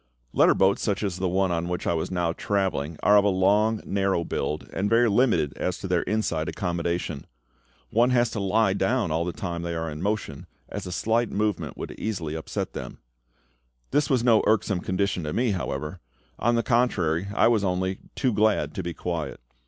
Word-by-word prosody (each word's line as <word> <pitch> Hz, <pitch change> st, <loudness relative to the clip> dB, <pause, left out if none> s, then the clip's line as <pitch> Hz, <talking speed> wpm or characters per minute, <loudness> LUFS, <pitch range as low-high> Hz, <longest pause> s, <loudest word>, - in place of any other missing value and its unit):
Letter -, -, +5 dB
boats 95 Hz, +1 st, +3 dB
such 100 Hz, 0 st, -1 dB
as 95 Hz, -4 st, -2 dB
the 95 Hz, 0 st, 0 dB
one 95 Hz, 0 st, +1 dB
on 85 Hz, 0 st, -1 dB
which 90 Hz, 0 st, -3 dB
I -, -, +1 dB
was 80 Hz, -, -2 dB
now 85 Hz, -2 st, 0 dB
travelling 90 Hz, -7 st, -1 dB
are 105 Hz, -, +6 dB
of 100 Hz, -, +5 dB
a -, -, +2 dB
long 105 Hz, +4 st, +2 dB
narrow 95 Hz, -3 st, 0 dB
build, 75 Hz, -1 st, -3 dB
and 100 Hz, +2 st, 0 dB
very 115 Hz, +2 st, +4 dB
limited 105 Hz, -, +2 dB
as 90 Hz, -, -1 dB
to 95 Hz, -, -6 dB
their 90 Hz, -2 st, +2 dB
inside 90 Hz, -6 st, -1 dB
accommodation. 85 Hz, -5 st, -3 dB, 0.6 s
One 120 Hz, +3 st, +4 dB
has 120 Hz, -2 st, +2 dB
to 110 Hz, -, -3 dB
lie 100 Hz, +1 st, +2 dB
down 100 Hz, 0 st, 0 dB
all 80 Hz, +2 st, 0 dB
the 90 Hz, -, -2 dB
time 85 Hz, -1 st, -4 dB
they 85 Hz, 0 st, -3 dB
are 80 Hz, -1 st, -3 dB
in 75 Hz, +1 st, -7 dB
motion, 100 Hz, -8 st, -3 dB, 0.2 s
as -, -, -5 dB
a -, -, -5 dB
slight 115 Hz, +5 st, +1 dB
movement 105 Hz, -2 st, -2 dB
would -, -, -6 dB
easily 90 Hz, -9 st, -3 dB
upset 80 Hz, 0 st, -4 dB
them. 60 Hz, -, -7 dB, 0.9 s
This 145 Hz, +1 st, +2 dB
was 125 Hz, -4 st, +2 dB
no 115 Hz, -3 st, +5 dB
irksome 105 Hz, -3 st, +2 dB
condition 95 Hz, +1 st, -1 dB
to 75 Hz, 0 st, -3 dB
me, 120 Hz, -1 st, +1 dB
however; 85 Hz, -2 st, -3 dB, 0.4 s
on 120 Hz, +1 st, +2 dB
the 115 Hz, -, +1 dB
contrary, 100 Hz, -9 st, +1 dB
I -, -, +5 dB
was 115 Hz, -3 st, +3 dB
only 95 Hz, 0 st, -1 dB, 0.2 s
too 130 Hz, -4 st, +1 dB
glad 105 Hz, +1 st, +2 dB
to 95 Hz, -, -3 dB
be 85 Hz, -1 st, -5 dB
quiet. 85 Hz, -3 st, -4 dB
95 Hz, 200 wpm, -25 LUFS, 85-110 Hz, 0.9 s, are